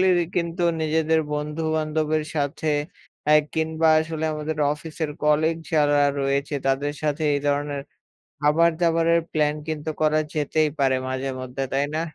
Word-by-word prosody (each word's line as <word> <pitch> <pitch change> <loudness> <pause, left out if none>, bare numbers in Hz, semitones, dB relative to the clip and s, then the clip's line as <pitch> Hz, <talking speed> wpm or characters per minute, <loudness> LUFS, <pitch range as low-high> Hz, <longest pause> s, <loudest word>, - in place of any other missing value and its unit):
সকলেরই 180 -2 +4
কিন্তু 170 +1 -1 0.2
নিজেদের 160 0 +2
বন্ধু-বান্ধবের 155 0 -1
সাথে 145 +2 -1 0.6
অ্যা 150 - +6 0.2
কিংবা 160 0 +1
আসলে 160 0 -3
আমাদের 155 0 -4
অফিসের 155 0 -5
কলিগ 155 +2 +3 0.2
যারা 145 -2 +3 0.2
রয়েছে 140 +1 0
তাদের 140 +2 +1
সাথে 150 0 -1
এই 145 - 0
ধরনের 145 -1 -1 0.6
খাবার-দাবারের 165 +2 +3
প্ল্যান 150 -1 +2
কিন্তু 155 0 -3
করা 155 0 +3
যেতেই 155 +1 +1
পারে 135 -1 +3
মাঝেমধ্যে 130 0 -3
তাই 140 +1 +1
না? 155 - 0
155 Hz, 130 wpm, -24 LUFS, 145-160 Hz, 0.6 s, অ্যা